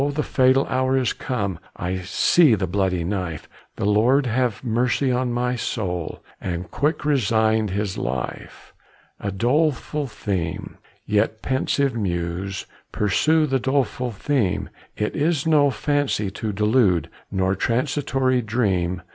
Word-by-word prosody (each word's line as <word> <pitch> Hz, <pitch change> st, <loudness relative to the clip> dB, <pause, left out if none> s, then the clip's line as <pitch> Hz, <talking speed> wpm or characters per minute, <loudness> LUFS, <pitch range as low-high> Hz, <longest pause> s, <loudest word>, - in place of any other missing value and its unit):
the 150 Hz, -, 0 dB
fatal 130 Hz, +1 st, +3 dB
hour 130 Hz, +1 st, +1 dB
is 130 Hz, -3 st, +1 dB
come, 100 Hz, -9 st, -3 dB, 0.2 s
I 90 Hz, +1 st, -3 dB
see 120 Hz, -, +4 dB
the 95 Hz, -2 st, -1 dB
bloody 95 Hz, -1 st, 0 dB
knife, 90 Hz, -4 st, -3 dB, 0.3 s
The -, -, -3 dB
Lord 120 Hz, +7 st, +3 dB
have 125 Hz, -2 st, 0 dB
mercy 120 Hz, +2 st, +1 dB
on 125 Hz, 0 st, 0 dB
my 125 Hz, +1 st, 0 dB
soul!" 90 Hz, -8 st, -3 dB, 0.2 s
And 90 Hz, -1 st, -4 dB
quick 150 Hz, +1 st, 0 dB
resigned 110 Hz, -6 st, +2 dB
his 100 Hz, 0 st, -2 dB
life. 60 Hz, +1 st, -5 dB, 0.5 s
A 100 Hz, -, -3 dB
doleful 145 Hz, +6 st, 0 dB
theme; 95 Hz, -8 st, -4 dB, 0.3 s
yet, 105 Hz, +1 st, 0 dB
pensive 135 Hz, +1 st, +1 dB
muse, 90 Hz, -1 st, -3 dB, 0.3 s
Pursue 155 Hz, +10 st, +2 dB
the 135 Hz, -2 st, 0 dB
doleful 130 Hz, -1 st, 0 dB
theme; 105 Hz, -4 st, -1 dB, 0.3 s
It 105 Hz, -, -2 dB
is 155 Hz, -1 st, +1 dB
no 150 Hz, -3 st, +4 dB
fancy 145 Hz, -8 st, 0 dB
to 105 Hz, +2 st, -3 dB
delude, 105 Hz, -, +2 dB, 0.2 s
Nor 95 Hz, 0 st, +1 dB
transitory 130 Hz, +3 st, 0 dB
dream. 95 Hz, -6 st, 0 dB
110 Hz, 130 wpm, -23 LUFS, 95-130 Hz, 0.5 s, see